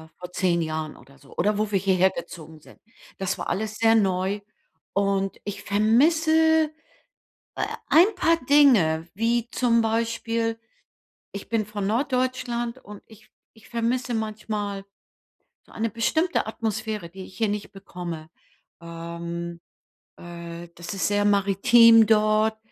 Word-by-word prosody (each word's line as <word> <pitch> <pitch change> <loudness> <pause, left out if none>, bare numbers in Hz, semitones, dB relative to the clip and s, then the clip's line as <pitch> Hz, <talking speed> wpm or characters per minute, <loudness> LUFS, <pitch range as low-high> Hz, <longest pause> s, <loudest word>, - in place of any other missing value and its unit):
vor 180 0 -10
10 175 -2 +1
Jahren 155 -1 -4
oder 135 +3 -19
so 140 - -18
oder 205 +3 +1
wo 215 0 -1
wir 195 - +2
hier 190 0 +1
her 185 +1 +4
gezogen 160 -2 -9
sind. - - -18 0.4
Das 190 -1 -2
war - - -4
alles 215 +2 -2
sehr 225 0 +4
neu 190 -1 +1 0.5
und 195 -1 0
ich 205 - -6
vermisse, 315 +9 +3 0.9
äh, - - -1 0.2
ein 370 +7 +5
paar 330 -2 +2
Dinge, 215 - +4
wie 230 +3 0
zum 235 -2 +2
Beispiel 230 0 -1 0.7
ich 200 - -8
bin 225 -2 0
von 205 -1 -4
Norddeutschland 250 0 -1
und 205 -1 -11
ich 215 -1 -19 0.2
ich 220 - -19
vermisse 240 +1 -1
manchmal 215 -2 -4 0.8
so - - -19
eine 225 0 -2
bestimmte 315 - 0
Atmosphäre, 220 -4 -4
die 190 +2 -9
ich - - -16
hier 225 -2 +1
nicht 205 0 -4
bekomme. 175 -5 -8 0.5
Ähm, 170 0 -7 0.6
äh, 170 0 -9
das 175 +4 -7
ist 195 - -1
sehr 205 0 +1
maritim 220 +3 +5
dort, 215 0 +3
210 Hz, 135 wpm, -24 LUFS, 185-230 Hz, 0.9 s, ein